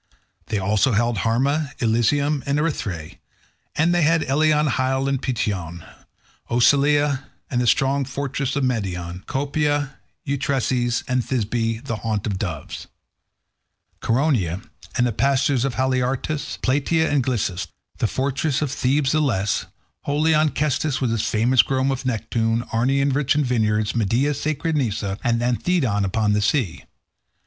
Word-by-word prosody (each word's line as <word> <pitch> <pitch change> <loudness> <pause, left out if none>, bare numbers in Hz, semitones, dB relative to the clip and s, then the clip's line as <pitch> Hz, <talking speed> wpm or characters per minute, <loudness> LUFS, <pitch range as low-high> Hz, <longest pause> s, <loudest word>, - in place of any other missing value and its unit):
They 110 - -1
also 105 +5 +2
held 115 0 +1
Harma, 140 - 0
Eilesium, 135 +6 +1
and 140 +1 +1
Erythrae; 100 - -3 0.6
and 165 +3 +2
they 175 - +2
had 165 +1 +3
Eleon, 150 +2 +2
Hyle, 130 0 0
and 135 -1 0
Peteon; 90 -9 -3 0.6
Ocalea 140 +3 +3 0.3
and 125 -2 +1
the 120 - 0
strong 135 +3 +2
fortress 135 0 -3
of 140 - 0
Medeon; 95 -7 -2
Copae, 145 +1 0 0.3
Eutresis, 130 -3 0
and 125 0 +1
Thisbe 115 -1 -2
the 115 - -3
haunt 110 -2 -2
of 100 -3 -2
doves; 80 -8 -5 1.1
Coronea, 115 - +1 0.4
and 125 - +3
the 120 - +1
pastures 135 +2 +1
of 135 -3 -1
Haliartus; 130 +3 -1
Plataea 150 +5 +2
and 145 -3 +1
Glisas; 100 -8 -1 0.3
the - - +2
fortress 140 +4 -1
of 140 - -2
Thebes 135 +1 +1
the 155 - +2
less; 105 -8 0 0.4
holy 150 +3 +2
Onchestus 150 -1 +1
with 125 -4 0
its 110 -1 -1
famous 115 +3 +4
grove 135 +1 0
of 130 0 -3
Neptune; 115 0 0
Arne 135 +4 +2
rich 140 0 +1
in 150 - +2
vineyards; 110 -4 +1
Midea, 120 +6 +1
sacred 155 +3 -2
Nisa, 105 -7 -1
and 120 -1 +1
Anthedon 125 - +1
upon 105 +2 +1
the 105 - +1
sea. 105 - 0
130 Hz, 140 wpm, -22 LUFS, 110-140 Hz, 1.1 s, famous